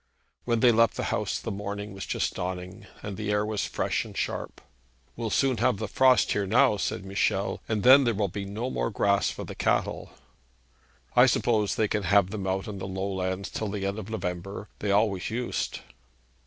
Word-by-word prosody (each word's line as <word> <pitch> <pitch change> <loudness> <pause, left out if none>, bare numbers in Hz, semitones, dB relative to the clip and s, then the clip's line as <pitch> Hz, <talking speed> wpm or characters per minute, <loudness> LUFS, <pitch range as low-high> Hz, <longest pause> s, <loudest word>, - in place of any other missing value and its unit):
When 115 -2 +1
they 125 - +7
left 115 0 +3
the - - -1
house - - -1
the - - -5
morning 100 +1 -5
was 95 - -7
just - - -1
dawning, 90 +1 -5 0.2
and 100 -2 -5
the 105 -1 -3
air 105 0 +1
was 105 -1 -2
fresh - - -1
and - - -11
sharp. - - -3 0.6
'We 115 - -4
shall - - -1
soon 130 +2 +2
have 125 -3 +2
the 110 - -3
frost 130 +2 +4
here 100 -1 0
now,' 120 +1 +4
said 95 - -3
Michel, 95 0 0
'and 110 -2 0
then 130 +2 +8
there 120 -3 +1
will 100 0 +1
be 100 +2 -5
no 110 +6 -4
more - - -1
grass 100 -1 +2
for - - -6
the - - -7
cattle.' - - -1 1.1
'I 125 +1 +7
suppose 110 -5 +1
they 110 - +2
can 105 +1 -1
have 95 0 +3
them 100 -3 -4
out 95 0 -1
on 100 -2 -6
the 95 - -5
low 95 +1 -3
lands 95 0 -3
till 110 - -3
the 100 -1 -3
end 100 +2 -2
of 105 0 -8
November. 100 -1 -5
They 105 - -2
always 100 -2 +2
used.' 120 +2 -3
105 Hz, 210 wpm, -27 LUFS, 95-110 Hz, 1.1 s, then